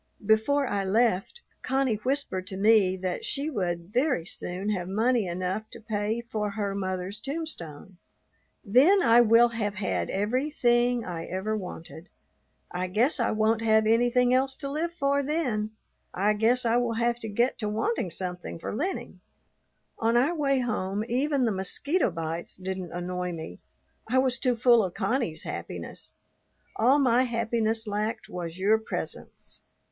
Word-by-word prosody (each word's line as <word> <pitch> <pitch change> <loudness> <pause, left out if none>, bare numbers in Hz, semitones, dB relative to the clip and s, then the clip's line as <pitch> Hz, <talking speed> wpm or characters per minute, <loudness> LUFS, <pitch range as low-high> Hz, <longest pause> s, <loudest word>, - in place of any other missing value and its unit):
Before 220 +7 +3
I 200 -5 -1
left, 220 - +1 0.2
Connie 265 -4 0
whispered 235 -6 -2
to 190 - -6
me 200 -2 +4
that 185 - -3
she 315 -8 -2
would 175 - -3
very 255 - +1
soon 180 +3 -5
have 180 -4 -2
money 225 +1 +1
enough 185 +5 -3
to - - -9
pay 215 +1 -2
for 215 -3 -3
her 200 -1 -3
mother's 185 +1 -3
tombstone. 205 - -6 0.7
"Then 295 - +5
I 230 +1 +6
will 235 +1 +6
have 210 -3 -3
had 190 -1 -2
everything 240 +1 +1
I 165 -2 -5
ever 190 +4 -2
wanted. 180 -3 -8 0.6
I 180 +1 -2
guess 235 - +2
I 235 - +2
won't 220 +1 +1
have 220 -1 +3
anything 245 +2 +3
else 265 +1 +2
to 275 -2 -5
live 325 +4 -1
for 280 -4 +1
then; 265 -8 -1 0.5
I 205 +3 +2
guess 235 +4 +2
I 230 +1 +3
will 245 -1 0
have 235 +1 0
to 225 - -5
get 235 +5 0
to 210 -3 -2
wanting 220 - -1
something 180 0 -5
for 165 - -5
Lennie." 360 - -3 0.8
On 230 +1 +2
our 275 +8 +3
way 280 -4 +1
home 210 -4 -2
even 270 +2 +1
the 225 - +1
mosquito 225 - 0
bites 165 -1 -4
didn't 185 -1 -5
annoy 180 0 -3
me; 160 - -8 0.5
I 255 - +2
was 260 -2 +2
too 250 -2 +2
full 235 -1 +5
of 180 -2 -4
Connie's 200 - -1
happiness. - - -6 0.7
All 255 +5 +4
my 255 -3 +4
happiness 230 -2 0
lacked 210 +1 -3
was 175 -1 -6
your 210 +4 +3
presence. 220 - -6
220 Hz, 155 wpm, -27 LUFS, 190-250 Hz, 0.8 s, I